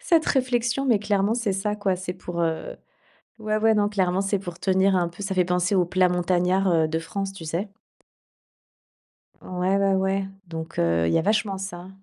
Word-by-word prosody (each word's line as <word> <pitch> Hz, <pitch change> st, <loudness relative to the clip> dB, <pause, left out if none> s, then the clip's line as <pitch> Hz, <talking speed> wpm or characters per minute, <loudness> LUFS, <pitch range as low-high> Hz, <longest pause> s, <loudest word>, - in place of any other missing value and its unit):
cette, 335 Hz, -9 st, +2 dB
réflexion, 250 Hz, 0 st, +1 dB
mais 235 Hz, -5 st, +4 dB
clairement, 205 Hz, +1 st, +1 dB
c'est 230 Hz, -4 st, -1 dB
ça, 195 Hz, +2 st, -1 dB
quoi. 200 Hz, -3 st, 0 dB
C'est 180 Hz, 0 st, -5 dB
pour, 175 Hz, -1 st, -6 dB
heu, 165 Hz, -1 st, -2 dB, 0.6 s
ouais, 215 Hz, 0 st, -1 dB
ouais, 220 Hz, +1 st, +4 dB
non, 205 Hz, -1 st, +2 dB
clairement, 190 Hz, -2 st, +1 dB
c'est 195 Hz, 0 st, 0 dB
pour 175 Hz, -3 st, -8 dB
tenir 190 Hz, +1 st, +2 dB
un 175 Hz, -2 st, +1 dB
peu 175 Hz, +4 st, -9 dB
ça 195 Hz, -1 st, -3 dB
fait 180 Hz, -1 st, +3 dB
penser 180 Hz, +2 st, +1 dB
au 180 Hz, -2 st, +3 dB
plat 185 Hz, +1 st, +2 dB
montagnard, 180 Hz, +2 st, +1 dB
heu, 160 Hz, -2 st, +3 dB
de 160 Hz, +1 st, -1 dB
France, 195 Hz, +4 st, -4 dB
tu 195 Hz, -, -10 dB
sais? 170 Hz, +6 st, -2 dB, 1.8 s
Ouais, 185 Hz, +1 st, -1 dB
ouais, 195 Hz, -1 st, +2 dB
ouais, 190 Hz, 0 st, 0 dB, 0.2 s
donc, 165 Hz, 0 st, -7 dB
heu, 85 Hz, 0 st, +2 dB
il 80 Hz, -, +1 dB
y -, -, +4 dB
a -, -, +1 dB
vachement 210 Hz, 0 st, +1 dB
ça. 185 Hz, -2 st, -7 dB
190 Hz, 200 wpm, -24 LUFS, 175-205 Hz, 1.8 s, mais